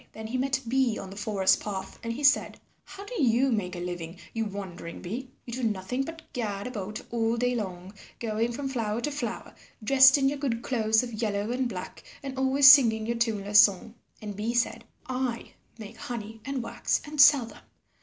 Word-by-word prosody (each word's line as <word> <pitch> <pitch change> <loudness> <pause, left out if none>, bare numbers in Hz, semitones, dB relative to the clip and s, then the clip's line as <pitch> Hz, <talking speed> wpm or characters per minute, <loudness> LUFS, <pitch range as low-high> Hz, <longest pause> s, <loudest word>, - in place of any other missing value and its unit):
Then 220 - -8
he 235 +4 -3
met 270 0 0
Bee 250 -2 +1
on 190 - -8
the - - -9
forest 200 -2 +2
path 195 -2 -6
and 230 - -4
he 265 +6 -5
said, 280 0 +3 0.3
"How 400 - -10
do 475 -2 -4
you 255 +1 +3
make 190 -5 -2
a - - -5
living, 175 -1 -6 0.2
you 225 -1 -1
wandering 190 -4 -7
bee? 240 +8 -6 0.2
You 235 - -7
do 255 - -4
nothing 215 +3 -1
but 325 +3 -6
gad 205 -6 -3
about 215 -3 -5
all 230 0 0
day 245 +1 +1
long, 190 -4 -5 0.3
going 225 +1 -1
from 270 +3 -4
flower 230 -4 -2
to 295 - -2
flower 240 -5 -5 0.3
dressed 265 +3 +7
in 270 -1 +2
your 280 +1 -1
good 235 -5 -2
clothes 220 -2 +2
of 240 -2 -6
yellow 210 0 -1
and 250 0 -1
black 185 -4 -8 0.2
and 270 -1 -5
always 265 +1 +4
singing 225 -6 +5
your 235 +1 -2
tuneless 210 -3 +2
song?" 205 +2 +4 0.3
And 205 -1 -6
Bee 220 +4 -2
said, 230 -1 0 0.2
"I 255 -2 -3 0.3
make 215 -2 -10
honey 225 -2 -7
and 275 -3 -3
wax - - -1
and 295 -1 +1
sell 285 -4 +7
them. 230 - -14
230 Hz, 200 wpm, -27 LUFS, 210-260 Hz, 0.3 s, dressed